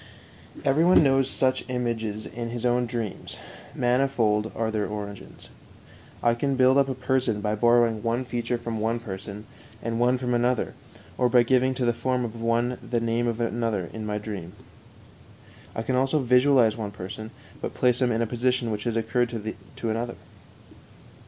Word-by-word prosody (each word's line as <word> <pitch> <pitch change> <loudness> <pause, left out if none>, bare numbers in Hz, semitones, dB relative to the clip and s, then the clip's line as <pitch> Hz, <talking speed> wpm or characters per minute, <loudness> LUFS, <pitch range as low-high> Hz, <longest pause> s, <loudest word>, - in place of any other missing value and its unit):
Every 140 +4 +4
one 175 -2 +6
knows 135 -1 +3
such 130 -1 +2
images 115 -4 -2
in 115 0 -5
his 120 0 -4
own 125 0 +2
dreams; 115 -4 -5 0.4
manifold 120 -4 +1
are 115 -1 -1
their 105 -1 -1
origins. 100 -1 -8 0.7
I 120 - +4
can 135 +3 0
build 130 +1 +5
up 135 -1 +2
a 130 - -2
person 130 -3 0
by 105 0 -1
borrowing 120 0 +3
one 120 +2 -1
feature 120 0 -2
from 115 -1 -4
one 115 +2 0
person 100 -1 -7 0.3
and 115 +1 -3
one 125 +1 +3
from 125 -1 -2
another, 120 0 +1 0.5
or 125 - +3
by 120 -1 +5
giving 130 +1 +2
to 125 - -1
the 120 - +3
form 125 +1 -1
of 115 0 -7
one 120 +2 0
the 120 - -1
name 115 +1 0
of 115 0 -2
another 115 -5 -1
in 110 - -5
my 105 0 -1
dream. 100 -5 -6 1.2
I 110 - -2
can 130 - 0
also 135 +4 +2
visualize 125 -3 +4
one 110 -3 -4
person, 105 +2 -7 0.3
but - - -4
place 125 0 +2
him 125 -1 +3
in 115 0 +1
a - - +1
position 120 0 0
which 105 -1 -4
has 115 -1 0
occurred 115 +2 +1 0.5
to 115 - -3
another. 120 +2 -3
120 Hz, 175 wpm, -26 LUFS, 110-125 Hz, 1.2 s, one